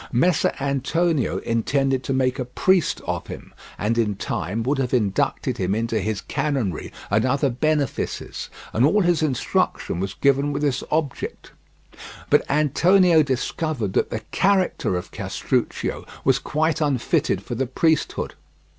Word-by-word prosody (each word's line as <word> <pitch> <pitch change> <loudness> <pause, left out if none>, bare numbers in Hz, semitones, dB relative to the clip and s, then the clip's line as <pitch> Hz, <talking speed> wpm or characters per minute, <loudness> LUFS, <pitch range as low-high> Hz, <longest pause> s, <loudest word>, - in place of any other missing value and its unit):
Messer 165 +6 +3
Antonio 140 +3 0
intended 135 +3 0
to - - -2
make 130 -1 +1
a 125 - -1
priest 180 +6 +1
of - - -3
him, - - -9 0.2
and 115 +3 0
in 105 -3 +1
time 100 +3 -3
would 135 +3 0
have 130 -1 0
inducted 105 -6 0
him 95 +2 0
into 115 0 0
his 105 +1 -2
canonry 130 - -2 0.2
and 105 +2 +3
other 140 +1 +1
benefices, 145 +1 -2 0.2
and 115 - +2
all 200 +10 +4
his 175 -3 +2
instruction 130 - 0
was 95 +1 -3
given 140 +2 +2
with 145 +1 -2
this 140 -2 0
object; 155 -4 -3 0.8
but - - +5
Antonio 165 +4 +4
discovered 135 - -2
that - - +1
the 110 - -3
character 190 - +1
of 90 - -7
Castruccio - - -2 0.2
was 135 0 +3
quite 160 +3 0
unfitted 140 -5 +1
for - - -5
the 130 +2 -1
priesthood. 160 +5 0
135 Hz, 145 wpm, -23 LUFS, 115-155 Hz, 0.8 s, but